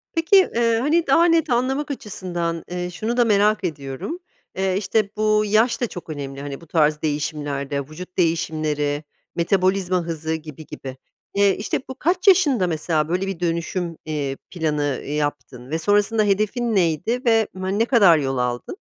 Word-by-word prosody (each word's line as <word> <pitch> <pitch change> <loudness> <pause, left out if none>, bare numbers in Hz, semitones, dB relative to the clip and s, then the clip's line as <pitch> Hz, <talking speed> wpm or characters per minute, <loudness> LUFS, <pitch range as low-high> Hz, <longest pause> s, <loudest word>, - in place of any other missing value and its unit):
Peki, 370 +4 +4
eee, 230 -1 +3
hani, 320 +4 +2
daha 335 - +5
net 330 -3 +3
anlamak 265 +4 0
açısından, 175 -8 -3
eee, 180 0 -3
şunu 220 +7 -3
da 240 - +4
merak 210 -1 +3
ediyorum. 150 - -4 0.4
Eee, 190 0 +1
işte, 200 0 0
bu 215 0 +3
yaş 225 +3 +2
da 240 - +1
çok 175 -4 -9
önemli, 140 -2 -6
hani, 140 +1 -6
bu 165 - -15
tarz 155 -2 +2
değişimlerde, 145 -2 -2
vücut 180 +4 -10
değişimleri, 155 -3 0 0.3
metabolizma 185 +1 +1
hızı 160 -1 -3
gibi 155 -1 -9
gibi. 130 -1 -8 0.4
Eee, 200 -1 +3
işte, 205 - -2
bu 260 - -6
kaç 365 +4 0
yaşında 285 - +5
mesela, 155 -1 -1
böyle, 185 +2 -1
bir 190 -3 -4
dönüşüm, 170 0 -2
eee, 145 -3 -3
planı 155 -4 -1 0.2
yaptın 145 -4 -4
ve 160 +2 -1
sonrasında 205 +4 +2
hedefin 215 +3 0
neydi 190 - 0
ve, 225 -2 +4
hani, 190 +3 -1
ne 230 - +4
kadar 200 -10 +6
yol 135 -2 -1
aldın? 125 - -3
180 Hz, 160 wpm, -22 LUFS, 155-220 Hz, 0.4 s, kadar